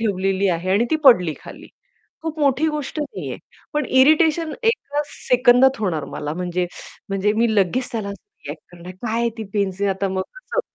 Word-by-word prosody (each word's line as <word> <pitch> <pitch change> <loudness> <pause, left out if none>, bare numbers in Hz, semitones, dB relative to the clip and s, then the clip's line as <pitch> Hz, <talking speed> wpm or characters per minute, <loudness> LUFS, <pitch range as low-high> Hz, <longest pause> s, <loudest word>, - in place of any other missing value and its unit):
ठेवलेली 195 -2 0
आहे 175 +1 -1
आणि 205 +5 +3
ती 315 - +3
पडली 180 - +6
खाली, - - -11 0.6
खूप 320 -1 -4
मोठी 285 +2 +2
गोष्ट 300 0 -4
नाहीये 300 +8 -5 0.4
पण 300 - +1
इरिटेशन 310 +4 +4
एका 295 -10 0 0.3
सेकंदात 250 +1 +5
होणार 170 -8 -1
मला 150 +1 -4
म्हणजे 180 0 -2 0.4
म्हणजे 195 +1 +1
मी 225 0 +1
लगेच 210 +6 +1
त्याला 220 -4 -3
असं 410 - -12
रिएक्ट - - -7
करणार, 175 +1 -10
"काय 220 +5 -3
आहे 235 0 +1
ती 220 - -4
पेन्सिल? 200 -1 0
आता 195 0 -1
मग 190 0 -1
कसं" - - -3
220 Hz, 175 wpm, -21 LUFS, 190-285 Hz, 0.6 s, पडली